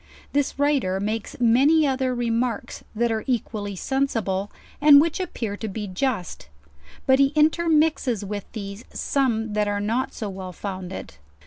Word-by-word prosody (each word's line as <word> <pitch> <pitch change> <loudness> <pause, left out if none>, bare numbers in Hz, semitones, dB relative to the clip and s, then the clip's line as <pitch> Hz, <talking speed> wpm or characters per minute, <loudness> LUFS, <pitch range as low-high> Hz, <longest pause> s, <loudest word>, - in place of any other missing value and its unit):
This 285 -1 0
writer 275 -10 +1
makes 215 +3 -3
many 270 +7 +5
other 260 -2 0
re 240 -1 -1
marks 230 -1 -2
that 235 +1 +1
are 220 -1 -1
equally 215 -5 -2
sensible, 210 -5 -1 0.3
and 290 -1 +9
which 325 +4 +1
appaa'r 225 - -4
to 220 - -3
be 210 +1 -4
just; 190 - -3 0.6
but 265 0 +4
he 275 - +6
intermixes 305 - +2
with 205 0 -6
these 200 0 -6
some 225 -6 0
that 210 0 +1
are 205 0 0
not 230 +6 -1
so 215 - -5
well 190 -2 -7
foun 190 -1 -5
ded. 190 - -7
230 Hz, 155 wpm, -24 LUFS, 205-275 Hz, 0.6 s, and